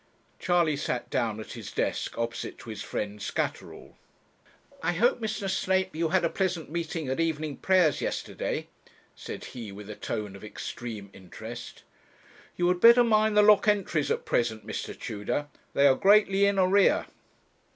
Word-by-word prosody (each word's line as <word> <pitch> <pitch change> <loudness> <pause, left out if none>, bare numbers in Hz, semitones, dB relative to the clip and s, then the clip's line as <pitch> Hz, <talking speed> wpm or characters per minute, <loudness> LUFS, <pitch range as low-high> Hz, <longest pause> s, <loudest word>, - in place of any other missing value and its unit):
Charley 170 -4 +2
sat 125 -4 -3
down 110 -2 0
at 110 - -8
his - - -8
desk - - -2
opposite 115 0 -3
to 115 - -9
his 105 -2 -6
friend 105 0 -4
Scatterall. - - -4 0.8
'I - - 0
hope, 240 +9 +2
Mr. 215 -3 -3
Snape, 190 -1 0
you 165 0 0
had 185 -1 +2
a - - +4
pleasant 180 -6 -2
meeting 165 -2 -3
at 130 +3 -2
evening 155 -3 -1
prayers 180 -6 +3
yesterday,' - - -3 0.5
said - - -8
he, 115 -5 -7
with 105 +1 -9
a - - -7
tone 105 -3 -4
of 100 - -12
extreme 105 -1 -7
interest. 110 +6 -9 0.7
'You 175 - +1
had 180 0 0
better 235 +1 +8
mind 215 -2 +3
the 210 - +7
lock 210 0 +6
entries 195 -8 +1
at - - -1
present, 110 -2 0
Mr. - - -5
Tudor; 120 +7 -3 0.3
they 140 - +4
are 135 - +7
greatly 200 +3 +4
in 200 0 +2
arrear.' 190 +1 +4
160 Hz, 160 wpm, -28 LUFS, 115-190 Hz, 0.8 s, better